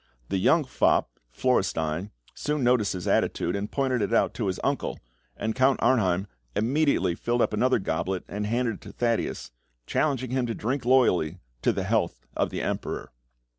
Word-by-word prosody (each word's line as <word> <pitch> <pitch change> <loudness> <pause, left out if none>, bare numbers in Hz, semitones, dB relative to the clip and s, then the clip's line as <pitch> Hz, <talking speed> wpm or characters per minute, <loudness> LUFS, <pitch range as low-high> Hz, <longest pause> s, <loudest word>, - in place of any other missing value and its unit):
The 95 - 0
young 160 - +4
fop, 130 - +2 0.2
Florestein, 90 - 0 0.2
soon 150 -2 -2
noticed 120 -4 +3
his 90 -2 -5
attitude, 85 - +1
and 100 +1 -3
pointed 130 -4 0
it 100 - -1
out 115 - +3
to 110 - -2
his 95 - -2
uncle, - - -1 0.4
and 110 - -1
Count 130 +2 +3
Arnheim 95 -7 +2 0.3
immediately 125 - +2
filled 120 +6 0
up - - 0
another 125 +5 +3
goblet 90 -1 -2
and 105 +1 -3
handed 115 -1 0
it - - -28
to 100 - -10
Thaddeus, 115 - -1 0.3
challenging 130 -5 0
him 130 -1 0
to 115 - -2
drink 125 +3 -2
loyally 95 -10 +3 0.2
to - - +3
the - - -2
health - - 0
of - - +1
the - - -4
Emperor. - - -3
115 Hz, 170 wpm, -26 LUFS, 95-130 Hz, 0.4 s, young